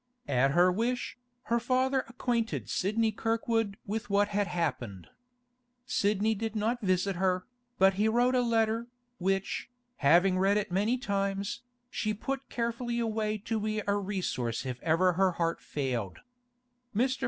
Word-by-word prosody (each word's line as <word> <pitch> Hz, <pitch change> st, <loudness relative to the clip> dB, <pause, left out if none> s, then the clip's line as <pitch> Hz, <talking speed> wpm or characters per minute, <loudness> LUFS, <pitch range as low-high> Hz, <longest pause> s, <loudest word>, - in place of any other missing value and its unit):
At 135 Hz, +2 st, +2 dB
her 180 Hz, +2 st, +5 dB
wish, 240 Hz, +6 st, -2 dB, 0.2 s
her 235 Hz, 0 st, +1 dB
father 260 Hz, +2 st, +1 dB
acquainted 235 Hz, -1 st, -1 dB
Sidney 220 Hz, +4 st, +1 dB
Kirkwood 225 Hz, -1 st, 0 dB
with 220 Hz, +3 st, -3 dB
what 205 Hz, +1 st, +3 dB
had 205 Hz, -1 st, 0 dB
happened. 130 Hz, -, -3 dB, 0.8 s
Sidney 215 Hz, -3 st, +1 dB
did 225 Hz, +1 st, -4 dB
not 225 Hz, +3 st, 0 dB
visit 185 Hz, -1 st, +1 dB
her, 185 Hz, 0 st, +1 dB, 0.3 s
but 190 Hz, +1 st, +5 dB
he 215 Hz, -, +4 dB
wrote 240 Hz, +3 st, +3 dB
a 250 Hz, -, +3 dB
letter, 230 Hz, -1 st, +1 dB, 0.3 s
which, 195 Hz, +4 st, -1 dB, 0.3 s
having 180 Hz, +6 st, +4 dB
read 195 Hz, +2 st, +3 dB
it 210 Hz, -2 st, -2 dB
many 210 Hz, +7 st, +2 dB
times, 200 Hz, -4 st, -2 dB, 0.3 s
she 215 Hz, -3 st, -1 dB
put 270 Hz, +5 st, -4 dB
carefully 235 Hz, 0 st, -2 dB
away 215 Hz, -2 st, 0 dB
to 225 Hz, -1 st, 0 dB
be 215 Hz, 0 st, -2 dB
a 200 Hz, -, +2 dB
resource 185 Hz, -, -2 dB
if 125 Hz, -1 st, -5 dB
ever 170 Hz, +3 st, +3 dB
her 185 Hz, +1 st, +2 dB
heart 165 Hz, -1 st, -1 dB
failed. 125 Hz, -9 st, -3 dB, 0.7 s
Mr. 260 Hz, +4 st, +1 dB
205 Hz, 145 wpm, -30 LUFS, 185-230 Hz, 0.8 s, her